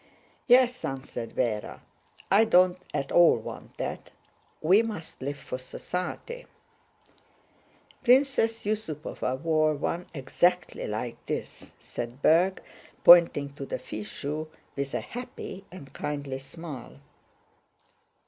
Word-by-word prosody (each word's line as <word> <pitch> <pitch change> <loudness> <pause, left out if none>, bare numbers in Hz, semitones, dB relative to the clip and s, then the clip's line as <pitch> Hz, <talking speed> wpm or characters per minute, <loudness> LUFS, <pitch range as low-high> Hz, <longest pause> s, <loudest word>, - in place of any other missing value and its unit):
"Yes," 250 0 +5
answered 130 -3 -4
Véra, 110 -4 -1 0.5
"I 205 +3 +7
don't 185 -3 +4
at 135 - -2
all 175 -6 +6
want 110 - -9
that. - - -4 0.5
We 185 +7 +5
must 210 -12 -6
live 140 +2 -3
for 130 -2 -6
society." 180 - -5 1.6
"Princess 250 -4 +3
Yusúpova 155 -10 -3
wore 155 -1 +2
one 170 +4 -3
exactly 175 +5 0
like 110 +3 -4
this," - - -5
said 120 +3 -7
Berg, 180 +4 +4 0.4
pointing 170 -5 +8
to 140 - -7
the 135 - -3
fichu 130 +7 -5 0.3
with 140 -1 -3
a - - 0
happy 215 -5 -8
and 170 -7 -11
kindly 140 -2 -4
smile. 140 - -9
155 Hz, 110 wpm, -28 LUFS, 135-190 Hz, 1.6 s, pointing